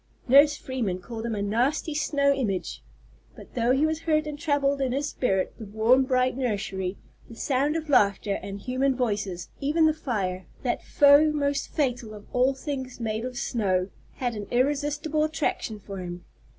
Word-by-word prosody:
Nurse 285 +3 +6
Freeman 235 -9 -3
called 225 +4 -6
him 225 - -2
a 200 - -2
"nasty 250 +9 0
snow 285 -2 +2
image." 210 -9 -2 0.5
But - - -14
though 235 -1 0
he 270 +4 +3
was 315 0 -1
hurt 310 -2 +1
and 295 -1 -6
troubled 285 -3 +1
in 260 -2 0
his 285 +2 -1
spirit, 195 -10 0
the 220 - -7
warm 225 +6 +3
bright 255 -1 +1
nursery, 200 -6 -2 0.3
the 230 - -10
sound 275 +5 0
of 320 -1 -3
laughter 200 -6 +2
and 200 0 -6
human 260 +3 0
voices, 205 -7 -2
even 305 +4 +2
the 310 - +4
fire, 195 -11 -3 0.2
that 245 - -1
foe 290 +2 +6
most 285 -2 -1
fatal 245 -6 -2
of 205 - -12
all 255 +2 +3
to - - -16
things 265 -5 -5
made 220 -1 -2
of 255 -1 -6
snow, 190 -6 0 0.2
had 245 -2 -2
an 210 -2 -6
irresistible 295 +4 0
attraction 305 -8 -2
for 195 -1 -8
him. 175 -1 -7
255 Hz, 175 wpm, -26 LUFS, 210-285 Hz, 0.5 s, Nurse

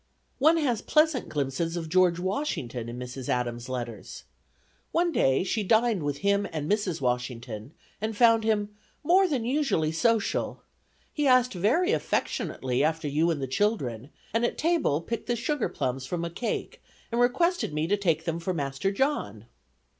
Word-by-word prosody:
One 315 +5 +5
has 255 -9 0
pleasant 305 -4 +2
glimpses 150 +4 -2
of 165 -1 -4
George 180 0 +3
Washington, 175 - -3
in 120 - -6
Mrs. 125 +1 -6
Adams' 120 0 -2
letters. 120 -5 -6 0.7
One 345 +1 +2
day 135 - +2
she 215 +3 -1
dined 220 0 +2
with 145 -1 -2
him 200 0 +2
and 155 -2 -3
Mrs. 200 -6 0
Washington 125 0 -3 0.3
and 220 -1 -3
found 230 -1 +5
him 210 -2 +1 0.3
"more 370 +5 +5
than 265 -9 -1
usually 255 - +1
social.... 220 +6 0 0.5
He 295 -2 +1
asked 255 -1 +4
very 250 - +2
affectionately 130 - -1
after 160 0 0
you 155 +4 +2
and 160 -3 0
the 135 - -2
children, 130 - -1 0.2
and 230 +1 +1
at 240 - 0
table 315 - +1
picked 230 +6 -5
the 240 - +1
sugar 255 +2 -1
plums 130 +1 -3
from 170 -1 -2
a 170 - -5
cake, 230 +7 -4 0.3
and 235 +1 +1
requested 340 - +2
me 150 +1 -1
to 195 +5 +2
take 165 -6 0
them 165 -1 -2
for 180 +2 -2
master 140 +5 -1
John." 200 - -1
180 Hz, 165 wpm, -27 LUFS, -, 0.7 s, One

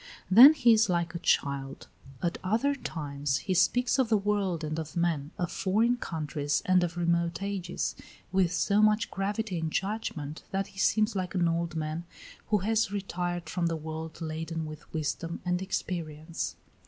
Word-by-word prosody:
Then 260 +10 +10
he 240 -5 +5
is 220 -2 +3
like 170 -1 0
a 170 - -4
child. 140 -4 0 0.4
At 170 -1 -1
other 230 +9 +2
times 145 - -3
he 190 - +1
speaks 245 +8 +3
of 255 -4 +2
the 220 - +4
world 200 -5 0
and 155 +1 -2
of 160 +1 -6
men, 165 -4 0
of 175 -4 -2
foreign 225 +6 +2
countries 150 -7 -2
and 185 -1 +4
of 175 0 -3
remote 170 +1 0
ages, 195 -3 -3 0.4
with 185 -2 +2
so 200 +3 +2
much 215 0 +3
gravity 200 -1 -2
and 160 -1 -2
judgment 180 -8 -3
that 195 0 -1
he 195 - -10
seems 215 +2 +2
like 185 -1 -3
an 175 -2 +3
old 170 0 -1
man 155 +2 -3 0.4
who 215 - +3
has 225 -1 +2
retired 175 -4 -3
from 175 +1 -1
the 165 - -1
world 160 +1 -6
laden 160 0 -4
with 155 0 -10
wisdom 165 +2 -3
and 180 0 0
experience. 165 -4 -4
175 Hz, 170 wpm, -29 LUFS, 160-200 Hz, 0.4 s, Then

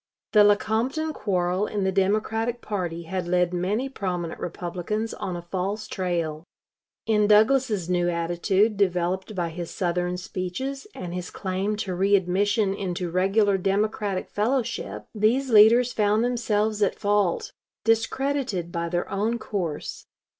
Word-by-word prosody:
The 210 -1 +7
Lecompton 225 +9 +1
quarrel 185 -3 0
in 205 -2 -2
the 190 - +1
Democratic 215 +5 0
party 175 -7 -3
had 180 +1 -4
led 180 0 +2
many 200 +9 0
prominent 180 -9 -4
Republicans 180 +6 -3
on 185 - -4
a 175 - -6
false 195 +4 -3
trail. 170 -5 -2 0.6
In 210 -2 +3
Douglas's 215 -2 +4
new 175 -1 +1
attitude, 175 +5 +1
developed 185 +1 0
by 175 -2 -1
his 170 +1 -6
Southern 180 0 -1
speeches 185 - -4
and 175 -1 -6
his 180 0 -4
claim 195 +2 -2
to 205 -3 -3
readmission 195 +2 +2
into 180 -3 -3
regular 195 +2 +2
Democratic 200 0 0
fellowship, 210 - -1
these 240 +5 +1
leaders 230 +3 +6
found 210 +1 +2
themselves 220 -3 0
at 200 - +2
fault, 205 -3 +1 0.3
discredited 225 -4 0
by 170 0 -2
their 175 +1 -1
own 210 +4 -1
course. 180 -9 -4
195 Hz, 130 wpm, -25 LUFS, 180-215 Hz, 0.6 s, The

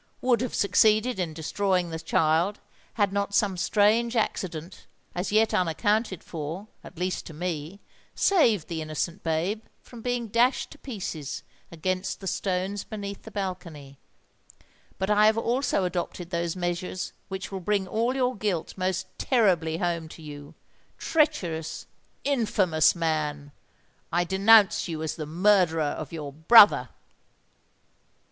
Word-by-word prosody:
would 245 -3 +2
have 250 - -3
succeeded 215 +3 +3
in 175 -3 -1
destroying 180 +2 -1
the 160 - -4
child, 165 +4 +1 0.4
had 205 -3 +1
not 200 0 -1
some 200 -3 +2
strange 220 +6 +2
accident, 175 -6 -3 0.3
as 180 +3 -3
yet 220 +1 +3
unaccounted 195 +3 0
for, 165 +5 -6 0.2
at 185 - -13
least 180 0 -2
to 160 - -10
me, 170 +2 -4 0.4
saved 235 - +3
the 165 -2 -4
innocent 155 +2 -3
babe 170 +7 -1 0.2
from 240 -2 -13
being 245 -1 -2
dashed 235 +5 +2
to 295 - -13
pieces 185 - -5 0.3
against 185 +3 -2
the 195 - -10
stones 190 +1 -2
beneath 200 -2 -7
the - - -11
balcony;—but 165 -8 -6 1.1
I 210 +1 +5
have 220 +1 +3
also 240 -2 0
adopted 175 0 -4
those 170 0 -1
measures 175 +1 -3
which 190 0 -6
will 195 - -4
bring 195 +1 0
all 230 +6 0
your 255 -1 +1
guilt 200 -6 -2
most 185 0 -1
terribly 180 - +2
home 170 -2 -2
to 160 - -12
you! 145 -1 -10 0.4
Treacherous—infamous 200 - 0
man, 150 -3 -2 0.6
I 175 +1 +2
denounce 210 +3 +5
you 160 -2 -4
as 160 - -3
the 155 -3 -6
murderer 175 -1 +3
of 145 0 -4
your 150 -4 -6
brother!" 205 +8 +7
185 Hz, 135 wpm, -26 LUFS, 165-215 Hz, 1.1 s, brother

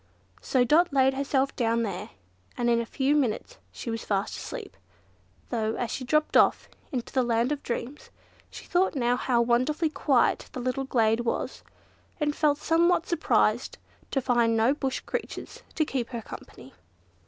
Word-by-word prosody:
So 255 -2 +2
Dot 320 +8 +4
laid 265 -1 +4
herself 275 0 0
down 230 -1 +1
there, 200 -1 -4 0.5
and 240 -1 +1
in 235 0 +3
a 230 - -6
few 275 +4 +1
minutes 290 - -1
she 235 - -6
was 225 0 -4
fast 195 -1 -1
asleep; - - -7 0.8
though, 220 -2 -1
as 240 - -3
she 260 - -4
dropped 305 +4 +1
off - - +4 0.2
into 250 -5 -4
the 260 - +3
land 235 +1 +1
of 290 -1 -2
dreams, 250 +4 -5 0.4
she - - -10
thought 360 -3 +1
how 245 0 +2
wonderfully 270 +7 +1
quiet 275 -5 +1
that - - -5
little 255 +2 -2
glade 225 -3 +2
was, 240 -1 -2 0.6
and 295 -1 0
felt 295 -2 +2
somewhat 335 +2 +2
surprised 340 -2 +1 0.3
to 270 - 0
find 235 -3 +2
no 230 +5 +4
Bush 270 -3 -2
creatures - - -6
to 310 - +2
keep 255 -5 -3
her 235 -3 -5
company. 130 -8 -11
255 Hz, 165 wpm, -27 LUFS, 235-290 Hz, 0.8 s, Dot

